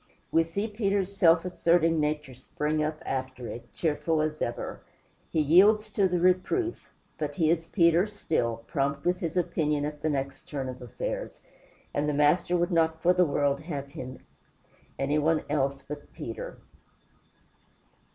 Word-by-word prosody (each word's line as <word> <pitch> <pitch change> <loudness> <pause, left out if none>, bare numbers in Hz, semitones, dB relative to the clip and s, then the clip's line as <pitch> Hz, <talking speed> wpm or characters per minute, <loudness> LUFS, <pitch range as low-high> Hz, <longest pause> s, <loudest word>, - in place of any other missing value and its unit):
We 165 - +5
see 200 +6 -3
Peter's 200 -3 -1
self 170 -4 +5
asserting 165 -2 +2
nature 150 -2 -1
spring 150 +4 -2
up 155 0 -2
after 130 -1 -3
it, 120 +1 -8
cheerful 160 0 0
as 155 0 -1
ever. 120 - -3 0.5
He 160 - 0
yields 200 +8 +5
to 200 -1 +3
the 180 -1 0
reproof; 185 - +1 0.3
but 145 -2 -3
he 160 -1 +3
is 165 -1 0
Peter 170 +1 +4
still, 120 - -2
prompt 140 -1 -1
with 180 +1 +2
his 165 +1 -3
opinion 150 -4 0
at 150 0 -5
the 155 - 0
next 135 -2 -3
turn 135 -3 -3
of 125 - -8
affairs, - - -5 0.5
and 150 +1 0
the 150 - 0
Master 150 +5 +3
would 175 +2 0
not 160 -1 +2
for 180 +2 +4
the 180 0 +4
world 140 -2 +1
have 145 -3 -5
him 130 -4 -9 0.7
anybody 150 +3 +1
else 140 -2 0
but 145 0 -8
Peter. 115 - -6
155 Hz, 155 wpm, -28 LUFS, 145-180 Hz, 0.7 s, We